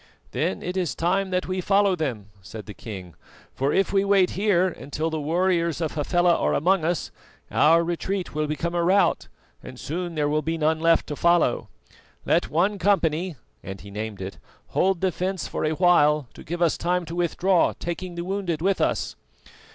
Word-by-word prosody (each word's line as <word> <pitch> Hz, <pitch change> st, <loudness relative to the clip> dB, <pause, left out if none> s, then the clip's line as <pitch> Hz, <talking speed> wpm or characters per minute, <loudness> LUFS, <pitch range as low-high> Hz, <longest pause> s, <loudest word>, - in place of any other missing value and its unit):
"Then 95 Hz, -, -2 dB
it 180 Hz, +1 st, -4 dB
is 180 Hz, -4 st, -1 dB
time 190 Hz, +3 st, 0 dB
that 185 Hz, 0 st, -1 dB
we 185 Hz, 0 st, -2 dB
follow 200 Hz, 0 st, +3 dB
them," 120 Hz, -, -4 dB
said 105 Hz, +3 st, -9 dB
the 105 Hz, -, -8 dB
king, 95 Hz, -7 st, -9 dB, 0.4 s
"for 135 Hz, +2 st, 0 dB
if 195 Hz, +4 st, +1 dB
we 195 Hz, 0 st, +3 dB
wait 195 Hz, -2 st, +3 dB
here 190 Hz, -2 st, +2 dB
until 160 Hz, -1 st, -4 dB
the 160 Hz, -, -2 dB
warriors 170 Hz, +1 st, +1 dB
of 160 Hz, -3 st, -1 dB
Hafela 175 Hz, +3 st, +2 dB
are -, -, +1 dB
among 180 Hz, +3 st, +2 dB
us, 170 Hz, +1 st, -1 dB, 0.4 s
our 165 Hz, +2 st, +5 dB
retreat 175 Hz, +3 st, -3 dB
will 155 Hz, 0 st, -1 dB
become 165 Hz, +3 st, -2 dB
a 170 Hz, -1 st, +1 dB
rout 190 Hz, +3 st, +2 dB, 0.3 s
and 125 Hz, -, -10 dB
soon 170 Hz, +2 st, -4 dB
there 150 Hz, -1 st, +1 dB
will 150 Hz, +1 st, +1 dB
be 165 Hz, +2 st, -2 dB
none 160 Hz, 0 st, +1 dB
left 165 Hz, 0 st, +3 dB
to 150 Hz, -, -5 dB
follow. 170 Hz, +2 st, +2 dB, 0.6 s
Let -, -, +2 dB
one 195 Hz, +6 st, +1 dB
company," 175 Hz, -3 st, +1 dB, 0.3 s
and 95 Hz, 0 st, -8 dB
he 100 Hz, -, -11 dB
named 105 Hz, -1 st, -5 dB
it, 95 Hz, -, -7 dB, 0.3 s
"hold 190 Hz, -2 st, +1 dB
the 190 Hz, -1 st, +2 dB
fence 185 Hz, +1 st, -3 dB
for -, -, -4 dB
a 155 Hz, -, +1 dB
while 150 Hz, -5 st, +4 dB
to -, -, -12 dB
give 175 Hz, +2 st, -2 dB
us 165 Hz, -, +1 dB
time 180 Hz, 0 st, 0 dB
to 165 Hz, -, -7 dB
withdraw, 175 Hz, +1 st, +2 dB
taking 175 Hz, +1 st, -5 dB
the 170 Hz, -, -4 dB
wounded 185 Hz, -4 st, -2 dB
with 190 Hz, +3 st, +1 dB
us." -, -, 0 dB
170 Hz, 190 wpm, -24 LUFS, 150-185 Hz, 0.6 s, our